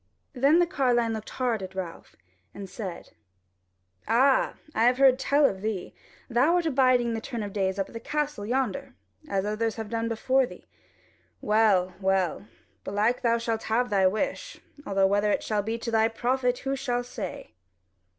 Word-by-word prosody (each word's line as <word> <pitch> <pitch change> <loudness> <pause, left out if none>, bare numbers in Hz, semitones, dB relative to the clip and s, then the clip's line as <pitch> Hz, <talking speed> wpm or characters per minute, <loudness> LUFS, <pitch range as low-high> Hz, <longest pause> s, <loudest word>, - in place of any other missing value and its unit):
Then 280 +5 +4
the 350 - +4
carline 245 -7 +1
looked 220 0 -6
hard 245 -5 -1
at 190 0 -8
Ralph, 180 -3 -7 0.4
and 200 -1 -7
said: 190 -3 -7 1.0
"Ah! 260 +5 +3 0.2
I 225 - +2
have 250 +1 +4
heard 265 -1 +5
tell 285 +2 +3
of 190 -7 0
thee: 210 -4 -4 0.3
thou 265 +8 +3
art 350 -1 +1
abiding 255 -5 +3
the 225 - -3
turn 235 -3 -5
of 205 - -5
the 205 - -4
days 190 0 0
up 195 - -1
at - - -16
the 230 - -5
castle 295 -3 -3
yonder, 235 - -2 0.3
as 195 0 0
others 215 +1 -1
have 220 -2 -6
done 230 0 -1
before 260 +3 +1
thee. - - -13 0.7
Well, 205 -4 +2
well, 190 0 0 0.4
belike 215 +5 0
thou 235 -1 +2
shalt 230 -1 -2
have 245 +2 +1
thy 195 -2 +4
wish, 360 - -3 0.3
though 195 -1 +2
whether 205 +2 +2
it - - 0
shall 210 -2 0
be 225 +3 -3
to 230 0 -5
thy 220 0 +3
profit, 245 +2 0
who 270 +1 -2
shall 245 -2 -2
say?" 245 - -7
230 Hz, 180 wpm, -27 LUFS, 205-255 Hz, 1.0 s, heard